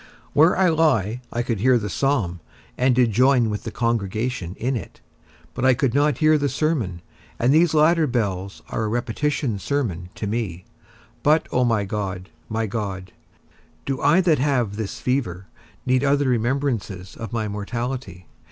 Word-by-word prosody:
Where 155 +5 +5
I 185 -1 +4
lie 125 - +2
I 120 - -1
could 115 -3 -2
hear 125 +3 +4
the 105 -3 -3
psalm, 105 -6 0 0.4
and 125 0 +2
did 120 -2 +3
join 125 0 +3
with 105 - -5
the - - -2
congregation 110 -4 -2
in 130 +3 -1
it; 115 - -7 0.5
but - - -4
I 130 -1 +5
could 125 -1 0
not 145 -1 +2
hear 155 -1 +4
the 145 0 0
sermon, 130 - -1 0.3
and 125 +4 +3
these 160 0 +4
latter 155 +1 +4
bells 100 -6 -2
are 110 - -2
a - - -1
repetition 120 +1 -1
sermon 95 - -2
to - - -4
me. 100 -5 -3 0.6
But, 155 +4 +3
O 125 - +2
my 115 -4 +1
God, 95 -2 -4 0.2
my 110 +1 -1
God, 95 -4 -4 0.7
do 135 -2 -2
I 150 +6 +5
that 165 -6 +3
have 125 -7 +1
this 110 +2 -5
fever 115 -7 -1 0.4
need 130 +1 +2
other 140 0 +2
remembrances 120 -6 -1
of 115 - -7
my 110 -2 -2
mortality? 105 -2 -5
120 Hz, 165 wpm, -23 LUFS, 105-140 Hz, 0.7 s, Where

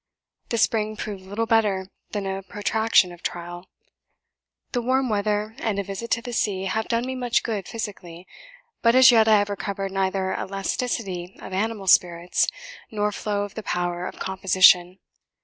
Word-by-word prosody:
The 230 - -1
spring 215 -1 +1
proved 200 -4 -6
little 205 +4 -2
better 210 -4 +2 0.2
than 205 -2 -3
a 195 0 -3
protraction 205 0 +2
of 175 0 -13
trial. 175 +1 -6 1.0
The 245 - 0
warm 260 +1 +1
weather 210 +1 0
and 215 -3 -1
a 200 - 0
visit 195 +4 -6
to 230 - -2
the 245 -1 -6
sea 195 -5 0
have 220 +3 -1
done 235 +1 0
me 260 - -3
much 245 -2 0
good 210 -5 -3
physically; 185 -6 -7 0.6
but 230 +1 +4
as 260 0 +9
yet 225 -2 +5
I 215 -1 +6
have 205 0 0
recovered 195 0 -4
neither 190 0 0
elasticity 195 -1 -3
of - - -9
animal 210 +1 -2
spirits, 175 -1 +3 0.4
nor 210 -1 -1
flow 205 0 -2
of 205 - -7
the 220 - -6
power 175 -2 -2
of - - -9
composition. 185 -1 +4
205 Hz, 165 wpm, -24 LUFS, 190-225 Hz, 1.0 s, as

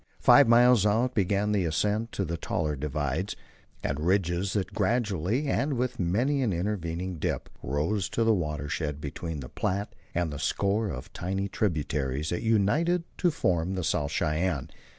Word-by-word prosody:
Five 140 -3 +7
miles 120 -2 +6
out 115 +5 +2
began 100 +1 +1
the 100 -3 +2
ascent 105 +8 0
to 100 - -1
the 85 0 -3
taller 75 -2 -2
divides 75 +5 -2 0.5
and 70 +1 -1
ridges 90 +2 +1
that 100 -1 -2
gradually, 110 - 0
and 140 +2 +1
with 125 0 -2
many 120 +11 +1
an 120 -6 +1
intervening 90 -2 -2
dip, - - -2
rose 80 +10 -1
to 115 - +4
the 115 0 +4
watershed 75 -4 -2
between 75 +1 -5
the 65 - -7
Platte 100 +2 -2 0.2
and 85 -3 0
the 70 - -5
score 100 +7 0
of 65 - -7
tiny 95 +2 -2
tributaries 75 -7 -1
that 85 - -2
united 140 - +2 0.2
to 175 - +4
form 90 - 0
the 90 - -2
South 75 -2 0
Cheyenne. 80 -2 -1
95 Hz, 160 wpm, -28 LUFS, 80-110 Hz, 0.5 s, Five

